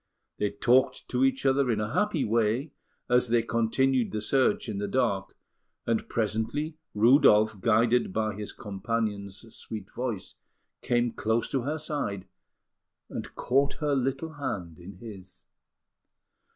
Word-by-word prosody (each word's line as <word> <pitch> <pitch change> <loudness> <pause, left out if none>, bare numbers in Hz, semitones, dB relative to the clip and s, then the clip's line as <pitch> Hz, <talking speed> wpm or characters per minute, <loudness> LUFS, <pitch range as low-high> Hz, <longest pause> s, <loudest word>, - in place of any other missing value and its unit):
They 105 - +1
talked 120 +6 +2
to 125 +1 +1
each 135 +1 +1
other 135 -1 +3
in 110 -3 +1
a 105 +2 -3
happy 210 -8 +1
way 115 +6 +1 0.4
as 125 0 +3
they 115 0 +2
continued 120 +2 +1
the 110 - -2
search 135 - +1
in 105 -3 -3
the 100 - -2
dark; 100 -7 -1 0.5
and 115 -1 -1
presently, 115 +8 -1 0.2
Rudolf, 110 -2 +5
guided 115 +1 +3
by 110 +1 -1
his 105 +1 -6
companion's 105 0 -4
sweet 105 -3 -8
voice, 120 -6 -4 0.5
came 120 -1 +1
close 110 +1 0
to 135 - 0
her 145 +6 -2
side, 145 -11 -3 0.9
and - - -6
caught 140 +3 +1
her 150 -2 -1
little 135 +4 -1
hand 100 - -5
in 90 +3 -10
his. 100 -6 -11
115 Hz, 140 wpm, -28 LUFS, 105-130 Hz, 0.9 s, Rudolf